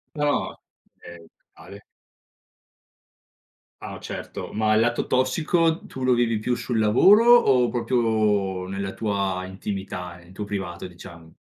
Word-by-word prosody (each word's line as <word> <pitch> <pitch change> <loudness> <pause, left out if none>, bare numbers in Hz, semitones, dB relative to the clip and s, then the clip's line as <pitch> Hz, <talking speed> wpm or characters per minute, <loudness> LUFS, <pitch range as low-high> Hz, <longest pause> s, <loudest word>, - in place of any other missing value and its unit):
No, 145 -1 -1 0.4
okay, 85 -1 -13 0.3
vale. 100 +2 -13 2.0
Ah, - - -7
certo, - - -7
ma 110 0 +1
il 110 - +4
lato 120 +1 0
tossico, 160 +6 +1
tu 130 - -7
lo 130 -1 +3
vivi 115 -2 +1
più 125 +3 -2
sul 120 -1 -3
lavoro, 125 - +5
o 125 - +4
proprio 110 -6 0
nella 95 0 -4
tua 100 -3 -2
intimità, 95 -2 -6
nel 85 +1 -18
tuo 105 - -5
privato 95 -4 -5
diciamo? 85 -2 -12
105 Hz, 125 wpm, -24 LUFS, 95-125 Hz, 2.0 s, lavoro